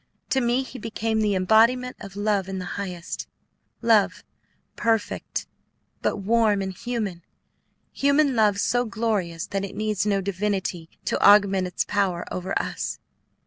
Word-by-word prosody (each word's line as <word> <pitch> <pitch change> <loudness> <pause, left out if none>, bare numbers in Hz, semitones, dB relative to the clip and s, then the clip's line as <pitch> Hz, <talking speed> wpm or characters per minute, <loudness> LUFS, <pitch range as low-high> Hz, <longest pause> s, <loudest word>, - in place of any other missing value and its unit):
To 265 - +3
me 240 +2 +1
he 260 -1 -9
became 225 0 -1
the 210 -2 +2
embodiment 230 +7 +3
of 200 -1 -10
Love 205 -2 0
in 190 - -3
the 185 - -4
highest, 180 -4 -5 0.6
Love 225 -3 +3 0.5
perfect, 225 -2 -1 0.6
but - - 0
warm 210 0 +2
and 190 0 -4
human; 215 -5 -4 0.7
human 280 -1 +3
Love 210 -3 +3
so 245 +4 +2
glorious 205 -7 -2
that 195 -1 -3
it 200 - -6
needs 215 -2 0
no 200 -1 +2
divinity 190 -3 -2 0.2
to - - -1
augment 195 -2 +6
its 180 - -2
power 195 -4 0
over 185 +1 -2
us. - - -3
205 Hz, 145 wpm, -25 LUFS, 190-230 Hz, 0.7 s, augment